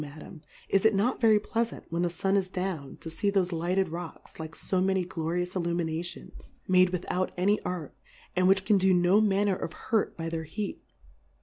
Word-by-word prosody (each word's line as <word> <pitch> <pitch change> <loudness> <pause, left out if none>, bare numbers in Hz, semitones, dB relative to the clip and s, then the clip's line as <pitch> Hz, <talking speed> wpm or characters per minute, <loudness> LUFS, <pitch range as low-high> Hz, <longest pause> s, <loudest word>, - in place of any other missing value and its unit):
Madam, 150 +3 -10 0.3
is 195 - +2
it 220 -1 +4
not 225 +8 +1
ve 230 - +5
ry - - +6
Pleafant, 230 +2 -2
when 170 +1 0
the 175 - +1
Sun 190 +3 0
is 195 -2 +2
down, 180 -7 -4
to - - -8
fee 200 +5 0
thofe 190 -2 +1
lighted 175 +2 0
Rocks, 170 0 -8
like 160 0 -7
fo 185 -1 0
many 190 -1 +1
glorious 175 +1 -3
Illuminations, 170 -1 -3
made 185 0 +5
without 180 +1 -2
any 200 +4 +2
Art, 175 -5 -4 0.4
and 185 0 +3
which 190 0 +3
can 205 -1 +4
do 190 0 +4
no 180 +4 +4
manner 200 -1 +2
of 170 - -5
Hurt 220 -2 -1
by 165 -1 -4
their 165 -1 -3
Heat 200 +6 -5
185 Hz, 195 wpm, -28 LUFS, 170-195 Hz, 0.4 s, ry